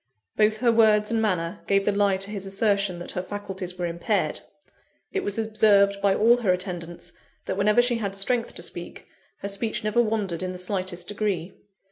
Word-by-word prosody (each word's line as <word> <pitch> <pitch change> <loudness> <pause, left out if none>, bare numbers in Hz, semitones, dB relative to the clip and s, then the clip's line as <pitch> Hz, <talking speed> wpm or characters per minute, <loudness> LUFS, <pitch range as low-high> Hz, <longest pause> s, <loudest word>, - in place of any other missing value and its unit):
Both 215 0 +3
her 240 -2 +4
words 215 -1 +4
and 225 -1 +1
manner 180 -5 -1
gave 195 0 +2
the - - +3
lie 200 -1 +2
to 195 +2 -5
his 195 -2 -4
assertion 200 -2 +1
that 175 - -6
her 180 - -3
faculties 190 -2 -6
were 175 - -2
impaired 170 0 -1 0.7
it 395 - -1
was 205 +1 -2
observed 210 -2 +3
by 200 -1 +3
all 235 +3 +5
her 220 -6 +1
attendants, 175 -2 -4 0.3
that - - -2
whenever 210 +4 +3
she 240 -1 +1
had 200 -3 -3
strength 230 +4 0
to - - -2
speak, - - -6 0.4
her - - -1
speech 210 +3 -2
never 215 +3 +2
wandered 210 -7 -1
in 185 0 -3
the - - -7
slightest 180 -1 -3
degree. 200 -4 -2
200 Hz, 190 wpm, -25 LUFS, 185-215 Hz, 0.7 s, all